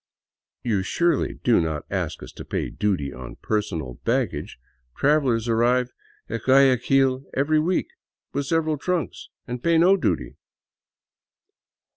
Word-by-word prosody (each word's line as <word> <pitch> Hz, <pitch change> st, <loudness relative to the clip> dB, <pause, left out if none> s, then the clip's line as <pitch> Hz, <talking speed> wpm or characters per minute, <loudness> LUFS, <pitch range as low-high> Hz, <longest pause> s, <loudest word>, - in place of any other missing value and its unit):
" -, -, -64 dB
You 105 Hz, -5 st, +1 dB
surely 170 Hz, -, 0 dB
do 120 Hz, -7 st, +4 dB
not 80 Hz, -2 st, -3 dB
ask -, -, -3 dB
us 65 Hz, -, -9 dB
to -, -, -9 dB
pay -, -, -3 dB
duty 95 Hz, -10 st, -1 dB
on 65 Hz, -1 st, -9 dB
personal 85 Hz, -, -3 dB
baggage? -, -, -1 dB, 0.4 s
Trav 150 Hz, +2 st, +3 dB
elers 115 Hz, -4 st, 0 dB
arrive 120 Hz, +2 st, +2 dB, 0.4 s
at 115 Hz, 0 st, -4 dB
Guayaquil 135 Hz, 0 st, +3 dB
every 155 Hz, +3 st, +2 dB
week 175 Hz, +4 st, 0 dB, 0.4 s
with 140 Hz, 0 st, -2 dB
several 160 Hz, -2 st, 0 dB
trunks, 180 Hz, -1 st, -3 dB, 0.2 s
and 125 Hz, 0 st, -5 dB
pay 170 Hz, +2 st, +3 dB
no 180 Hz, +4 st, +6 dB
duty." 195 Hz, -, -2 dB
125 Hz, 135 wpm, -24 LUFS, 105-155 Hz, 0.4 s, no